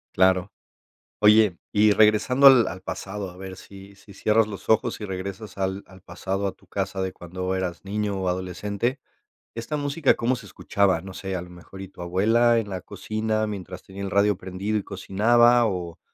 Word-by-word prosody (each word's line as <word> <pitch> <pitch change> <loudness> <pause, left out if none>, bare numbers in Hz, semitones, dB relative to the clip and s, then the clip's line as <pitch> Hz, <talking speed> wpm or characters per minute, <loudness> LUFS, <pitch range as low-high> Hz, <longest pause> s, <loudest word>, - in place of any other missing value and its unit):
Claro. 95 +1 +3 0.7
Oye, 105 -3 +5
y 105 0 +4
regresando 110 +6 +5
al 130 -4 +7
al 95 +2 -6
pasado, 95 0 -5
a 90 - -16
ver 95 0 -8
si 100 +1 -13
si 100 0 -16
cierras 110 +3 +2
los 100 -3 -9
ojos, 115 +2 +1
y 105 - -5
regresas 95 +3 -6
al 95 0 -2
al 95 -1 -16
pasado 95 +2 -3
a - - -2
tu - - -25
casa 95 -1 -3
de 95 -1 -3
cuando 90 +2 -4
eras 90 -1 -4
niño, 105 0 -2
o 95 - -2
adolescente, 100 +8 -2 0.5
¿esta 115 +6 -4
música 145 0 +2
cómo 125 +2 0
se 115 - -11
escuchaba? 95 -2 0
No 95 +1 -9
sé, 95 0 -5
a 90 - -3
lo 90 - -10
mejor 90 +2 -12
y 95 - -8
tu 90 - -13
abuela 110 +7 +3
en 110 -3 -2
la 95 -2 -4
cocina 110 +2 -2
mientras 95 -3 -7
tenía 95 +1 -10
el 100 - -3
radio 100 -1 +3
prendido 95 +4 -3
y 105 - -2
cocinaba, 120 +5 +3
o 90 -4 -4
100 Hz, 195 wpm, -24 LUFS, 95-110 Hz, 0.7 s, al